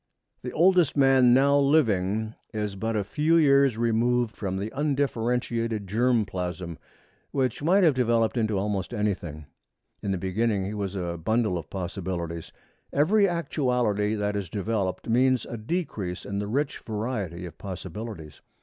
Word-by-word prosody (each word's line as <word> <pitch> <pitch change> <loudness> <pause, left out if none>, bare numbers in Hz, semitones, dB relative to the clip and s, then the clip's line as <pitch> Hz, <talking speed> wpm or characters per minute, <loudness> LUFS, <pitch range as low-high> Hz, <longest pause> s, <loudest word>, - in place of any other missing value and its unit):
The 125 - -5
oldest 175 -3 +3
man 135 -2 +5
now 140 +3 +5
living 110 -7 +2 0.2
is 105 -2 -2
but 110 +3 -2
a 105 - +1
few 150 +11 +2
years 140 -5 +4
removed 120 0 +1
from 95 -2 -3
the 100 +3 -4
undifferentiated 120 -6 -1
germ 115 +3 +2
plasm, 90 -3 -5 0.5
which 130 -1 -1
might 185 +6 +4
have 160 -4 +5
developed 115 -3 +2
into 110 -4 0
almost 100 +2 -2
anything. 90 -8 -2 0.6
In 100 - -3
the 95 - 0
beginning 95 +2 0
he 100 - -4
was 100 -2 -3
a 85 -3 -3
bundle 110 -1 +1
of 80 -3 -5
possibilities. 90 -3 -4 0.4
Every 200 +8 +4
actuality 125 -10 0
that 105 -1 -1
is 100 -4 -3
developed 100 -1 -2
means 125 +2 +3
a - - -6
decrease 110 - -3
in 100 0 -3
the 105 - -3
rich 135 +6 -1
variety 105 -6 -4
of 85 - -10
possibilities. 95 -3 -7
110 Hz, 150 wpm, -26 LUFS, 95-130 Hz, 0.6 s, man